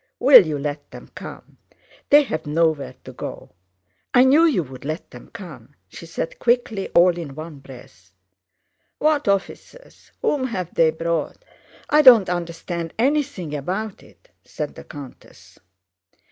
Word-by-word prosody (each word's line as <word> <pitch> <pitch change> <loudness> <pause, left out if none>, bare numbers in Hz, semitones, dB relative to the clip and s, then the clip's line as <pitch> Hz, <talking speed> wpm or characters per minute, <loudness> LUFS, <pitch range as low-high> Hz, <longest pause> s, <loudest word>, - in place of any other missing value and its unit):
Will 250 - +8
you 150 -2 -2
let 145 +1 -5
them - - -12
come? - - -11 0.5
They 290 +1 +7
have 155 - -5
nowhere 150 -4 0
to - - -11
go. - - -8 0.6
I 250 - +7
knew 285 +6 +5
you'd 155 - -2
let 155 +4 -5
them - - -13
come!" 170 - -11
she 170 - -11
said 165 0 -5
quickly 235 -4 0
all 175 0 +5
in 160 -6 -7
one 155 -1 -9
breath. 120 -9 -15 0.9
"What 300 -3 +1
officers? 200 - -4
Whom 290 - 0
have 185 -8 -5
they 165 -1 +4
brought? 165 - -3 0.4
I 300 - +5
don't 240 -9 +7
understand 170 -1 -4
anything 265 - -1
about 190 +9 -4
it," - - -22
said - - -6
the - - -12
countess. 145 -4 -13
175 Hz, 140 wpm, -22 LUFS, 155-245 Hz, 0.9 s, Will